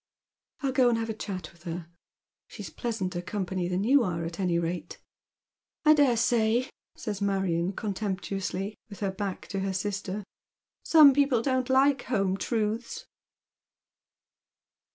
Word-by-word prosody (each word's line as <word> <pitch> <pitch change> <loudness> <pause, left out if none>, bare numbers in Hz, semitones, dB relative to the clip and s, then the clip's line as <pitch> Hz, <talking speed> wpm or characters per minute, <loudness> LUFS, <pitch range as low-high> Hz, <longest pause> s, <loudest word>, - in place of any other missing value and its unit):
" - - -65
I'll 270 - +1
go 255 -2 +4
and 235 - +2
have 225 0 -2
a - - -3
chat 190 -6 -6
with 170 - -23
her. 170 0 -5 0.6
She's 195 -8 -9
pleasanter 185 -2 -3
company 185 -1 -3
than 180 +2 -1
you 270 +5 +5
are, 170 -4 -2
at 165 +2 -6
any 180 -3 +1
rate." 170 -1 -3 0.4
" - - -51
I 305 - +8
dare 280 -6 +4
say," 235 +2 +2 0.2
says 205 -2 -5
Marion 190 -3 0
contemptuously, 195 -1 -3 0.2
with 200 - -11
her 195 -1 0
back 195 -1 -4
to 195 - -2
her 195 0 -1
sister. 200 +1 -3 0.3
'' - - -61
Some 305 -4 +8
people 275 -4 +2
don't 260 -1 0
like 270 +1 +3
home 195 -6 +1
truths." 220 +2 -2
200 Hz, 155 wpm, -28 LUFS, 185-235 Hz, 0.6 s, I